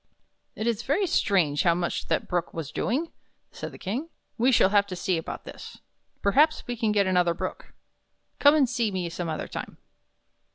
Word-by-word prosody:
"It 215 Hz, -, -4 dB
is 235 Hz, -2 st, 0 dB
very 290 Hz, +11 st, +1 dB
strange 175 Hz, -, +2 dB
how 170 Hz, -2 st, +3 dB
much 175 Hz, 0 st, -2 dB
that -, -, 0 dB
Brook 175 Hz, -1 st, -2 dB
was 165 Hz, -4 st, -5 dB
doing," 300 Hz, +8 st, -1 dB, 0.4 s
said -, -, -7 dB
the -, -, -11 dB
King. 250 Hz, -, -4 dB, 0.3 s
"We 250 Hz, +3 st, +3 dB
shall 210 Hz, -6 st, +5 dB
have 200 Hz, 0 st, +3 dB
to 185 Hz, -, -5 dB
see 180 Hz, +1 st, 0 dB
about 160 Hz, -, -5 dB
this. -, -, -10 dB, 0.5 s
Perhaps 295 Hz, +10 st, +3 dB
we 245 Hz, -, -3 dB
can 225 Hz, -2 st, 0 dB
get 205 Hz, -1 st, +3 dB
another 180 Hz, -2 st, +2 dB
Brook. -, -, -6 dB, 0.6 s
Come 290 Hz, +1 st, +7 dB
and 285 Hz, -4 st, +4 dB
see 235 Hz, -2 st, 0 dB
me 185 Hz, -3 st, -3 dB
some 170 Hz, 0 st, -4 dB
other 155 Hz, -, -3 dB
time." -, -, -7 dB
200 Hz, 190 wpm, -26 LUFS, 175-250 Hz, 0.6 s, Come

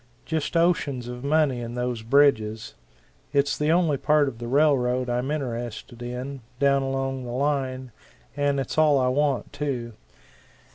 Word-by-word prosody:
Just 160 Hz, +1 st, -1 dB
oceans 145 Hz, -8 st, +1 dB
of 125 Hz, +1 st, -7 dB
money 145 Hz, -4 st, +2 dB
in 120 Hz, 0 st, -6 dB
those 125 Hz, -2 st, -2 dB
bridges. 110 Hz, -4 st, +2 dB, 0.6 s
It's 140 Hz, 0 st, +2 dB
the 150 Hz, +1 st, -1 dB
only 165 Hz, -4 st, +3 dB
part 150 Hz, +1 st, +3 dB
of 115 Hz, -4 st, -5 dB
the 120 Hz, -, -5 dB
railroad 130 Hz, -3 st, +2 dB
I'm 125 Hz, +3 st, -1 dB
interested 120 Hz, -5 st, -4 dB
in, 125 Hz, +3 st, -5 dB, 0.2 s
down 140 Hz, -1 st, +3 dB
along 135 Hz, -1 st, -2 dB
the 120 Hz, -, -7 dB
line 130 Hz, -1 st, -1 dB, 0.4 s
and 145 Hz, -1 st, +1 dB
it's 135 Hz, +3 st, -2 dB
all 150 Hz, -2 st, +5 dB
I 130 Hz, -1 st, +2 dB
want, 140 Hz, 0 st, 0 dB
too. 135 Hz, -5 st, -3 dB
135 Hz, 150 wpm, -25 LUFS, 125-145 Hz, 0.6 s, all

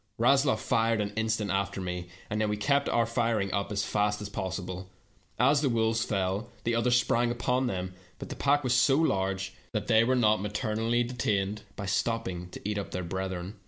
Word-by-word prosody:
Rasloff' 135 Hz, +1 st, +4 dB
fired 115 Hz, 0 st, +1 dB
an 105 Hz, -1 st, -2 dB
instant 110 Hz, -2 st, 0 dB
after 100 Hz, 0 st, -1 dB
me, 90 Hz, -1 st, -4 dB, 0.2 s
and 105 Hz, +1 st, -2 dB
then 110 Hz, -, +1 dB
we 105 Hz, -, -1 dB
kept 140 Hz, +6 st, +2 dB
up -, -, 0 dB
our 115 Hz, -, +4 dB
firing 115 Hz, -4 st, 0 dB
as 100 Hz, +1 st, -1 dB
fast 105 Hz, 0 st, 0 dB
as 105 Hz, -1 st, -6 dB
possible. 95 Hz, -2 st, -4 dB, 0.5 s
As 140 Hz, +4 st, +4 dB
the 140 Hz, -, +2 dB
wolves 115 Hz, -1 st, +1 dB
fell, 95 Hz, 0 st, -1 dB
the 115 Hz, -, 0 dB
others 120 Hz, +1 st, +3 dB
sprang 120 Hz, 0 st, +1 dB
upon 125 Hz, +2 st, 0 dB
them, 95 Hz, -4 st, -3 dB, 0.2 s
but -, -, -8 dB
the -, -, -5 dB
pack 145 Hz, +1 st, +2 dB
was 125 Hz, -2 st, +1 dB
so 120 Hz, +2 st, +4 dB
large 95 Hz, -9 st, 0 dB, 0.2 s
that 105 Hz, -2 st, -1 dB
they 110 Hz, -1 st, +5 dB
were 130 Hz, +2 st, +2 dB
not 110 Hz, -3 st, +3 dB
materi 105 Hz, +2 st, -2 dB
ally 120 Hz, +2 st, +2 dB
detained 105 Hz, -4 st, -1 dB
by 100 Hz, -, -5 dB
stopping 95 Hz, -2 st, -1 dB
to -, -, -9 dB
eat 105 Hz, -1 st, -1 dB
up 100 Hz, -, -5 dB
their 90 Hz, -, -4 dB
brethren. 95 Hz, +2 st, -4 dB
105 Hz, 200 wpm, -29 LUFS, 95-120 Hz, 0.5 s, they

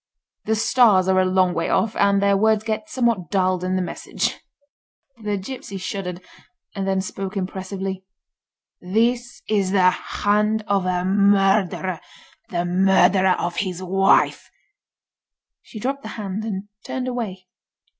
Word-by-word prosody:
The 220 Hz, -, +1 dB
Stars 215 Hz, -4 st, +4 dB
are 190 Hz, 0 st, +3 dB
a 185 Hz, -, +3 dB
long 185 Hz, -1 st, +2 dB
way 165 Hz, 0 st, -1 dB
off, 225 Hz, -1 st, +1 dB
and 200 Hz, 0 st, +3 dB
their 200 Hz, 0 st, +4 dB
words 215 Hz, +1 st, +2 dB
get 220 Hz, +8 st, -3 dB
somewhat 235 Hz, -, 0 dB
dulled 185 Hz, -2 st, +1 dB
in 185 Hz, 0 st, -1 dB
the 185 Hz, -, 0 dB
message." -, -, -3 dB, 0.8 s
The 210 Hz, -1 st, -2 dB
gipsy 200 Hz, 0 st, -7 dB
shuddered, 185 Hz, -1 st, -5 dB, 0.5 s
and 195 Hz, -1 st, -3 dB
then 190 Hz, 0 st, +1 dB
spoke 195 Hz, +1 st, -5 dB
impressively. 190 Hz, 0 st, -4 dB, 0.8 s
"This 235 Hz, +6 st, -1 dB
is 200 Hz, -3 st, +1 dB
the 185 Hz, -2 st, +4 dB
hand 210 Hz, +3 st, 0 dB
of 195 Hz, -2 st, +1 dB
a 180 Hz, 0 st, 0 dB
murderer—the 195 Hz, -, 0 dB
murderer 190 Hz, +1 st, +4 dB
of 175 Hz, 0 st, -3 dB
his 185 Hz, -2 st, -3 dB
wife!" 195 Hz, +1 st, +2 dB, 1.1 s
She 215 Hz, -, -11 dB
dropped 275 Hz, +5 st, -2 dB
the -, -, -8 dB
hand 205 Hz, 0 st, -4 dB
and 200 Hz, -2 st, -4 dB, 0.2 s
turned 255 Hz, -1 st, -4 dB
away. 215 Hz, -7 st, -4 dB
195 Hz, 135 wpm, -22 LUFS, 185-215 Hz, 1.1 s, Stars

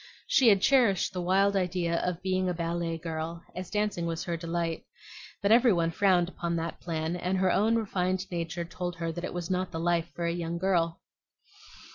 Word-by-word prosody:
She 460 Hz, -, +4 dB
had 200 Hz, -3 st, +5 dB
cherished 230 Hz, -9 st, +3 dB
the 180 Hz, -, -3 dB
wild 195 Hz, +3 st, +3 dB
idea 180 Hz, -3 st, 0 dB
of 180 Hz, 0 st, -3 dB
being 185 Hz, -1 st, +1 dB
a 180 Hz, -, -1 dB
ballet 170 Hz, 0 st, -2 dB
girl, 165 Hz, +1 st, -5 dB
as 185 Hz, 0 st, -5 dB
dancing 210 Hz, -5 st, -1 dB
was 165 Hz, 0 st, -3 dB
her 170 Hz, -, -2 dB
delight; 165 Hz, 0 st, -3 dB, 0.6 s
but 200 Hz, -, +3 dB
every 240 Hz, +1 st, +6 dB
one 170 Hz, -3 st, +1 dB
frowned 180 Hz, -1 st, +3 dB
upon 170 Hz, -1 st, -3 dB
that 165 Hz, 0 st, -3 dB
plan, 160 Hz, 0 st, -2 dB
and 180 Hz, +2 st, -1 dB
her 185 Hz, -1 st, +2 dB
own 220 Hz, +5 st, +3 dB
refined 185 Hz, -4 st, -1 dB
nature 170 Hz, 0 st, -3 dB
told 175 Hz, +1 st, -5 dB
her 165 Hz, -1 st, -3 dB
that 175 Hz, +2 st, -6 dB
it -, -, -3 dB
was 175 Hz, 0 st, -4 dB
not 185 Hz, 0 st, 0 dB
the 165 Hz, -, -4 dB
life 170 Hz, 0 st, +1 dB
for 170 Hz, -, -2 dB
a 170 Hz, -, +1 dB
young 170 Hz, -1 st, -3 dB
girl. 170 Hz, -2 st, +1 dB
175 Hz, 200 wpm, -29 LUFS, 170-190 Hz, 0.6 s, every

